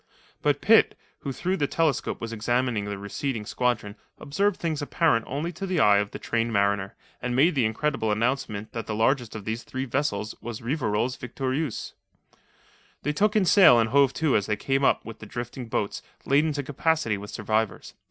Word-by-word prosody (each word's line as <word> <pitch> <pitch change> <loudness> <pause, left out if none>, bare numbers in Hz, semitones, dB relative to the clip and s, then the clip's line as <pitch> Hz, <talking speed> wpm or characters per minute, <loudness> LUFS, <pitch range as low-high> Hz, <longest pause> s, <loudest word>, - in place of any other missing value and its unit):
But - - +1
Pitt, - - +5 0.2
who 140 - -4
through 185 +8 -1
the 145 - +1
telescope 160 -4 0
was 115 0 -5
examining 120 -1 0
the 100 -1 -4
receding 105 +3 -4
squadron, 110 -4 -1 0.2
observed 200 +7 0
things 160 -3 -2
apparent 145 -5 +1
only 150 +6 -3
to 185 +3 -6
the 180 -3 0
eye 105 -6 +6
of 100 0 -1
the - - -7
trained 115 0 -1
mariner, 100 -1 +1 0.3
and 125 -1 -2
made 155 +7 +4
the 130 -5 +2
incredible 110 0 0
announcement 110 -2 -1
that 115 -1 -5
the 110 - -2
largest 120 +1 +1
of 105 -2 -7
these 110 +2 -3
three 130 +2 -5
vessels 115 -6 -1
was 115 -1 -6
Rivarol's 125 -2 -1
Victorieuse. 130 +2 -3 1.1
They 150 - 0
took 210 +7 +2
in 210 -3 +4
sail 175 - +7
and 110 -1 +1
hove 140 -1 +5
to 150 -1 +1
as 100 - +1
they 105 - +1
came 135 +5 0
up - - +2
with 115 -1 -9
the 110 - -10
drifting 120 +2 -6
boats, 105 -2 -2 0.2
laden 145 +3 +3
to 145 0 -3
capacity 145 -4 0
with 105 +1 -8
survivors. 110 +1 -2
125 Hz, 190 wpm, -26 LUFS, 110-145 Hz, 1.1 s, sail